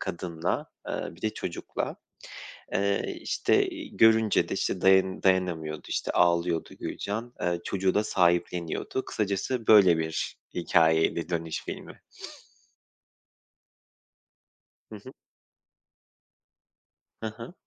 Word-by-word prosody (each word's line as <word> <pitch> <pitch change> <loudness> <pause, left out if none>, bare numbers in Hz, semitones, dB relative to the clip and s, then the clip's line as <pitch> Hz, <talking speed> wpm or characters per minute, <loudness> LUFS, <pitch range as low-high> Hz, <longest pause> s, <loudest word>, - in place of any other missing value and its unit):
kadınla, 85 -3 -3 0.2
ııı, - - -4
bir 95 - -19
de 110 - +1
çocukla. 85 - -4 0.8
Eee, 100 0 0
işte, - - +1
iii, - - -9
görünce 110 -1 +4
de, - - -2
işte, 90 - -1
dayan 95 0 +4
dayanamıyordu, 85 -5 0
işte, - - -1
ağlıyordu 85 -1 +2
Gülcan. 115 +4 -4
Iıı, 85 -1 0
çocuğu 95 -1 0
da 105 - +2
sahipleniyordu. 85 +4 0
Kısacası, 105 +4 -2
böyle 95 -6 +7
bir 80 0 -3 0.2
hikâyeydi 80 -1 +2
"Dönüş" 85 -2 -3
filmi. - - -8 2.9
Hı 110 - -7
hı. 130 - -11 2.1
Hı 110 - -2
hı. 115 +7 -9
90 Hz, 100 wpm, -27 LUFS, 85-105 Hz, 2.9 s, böyle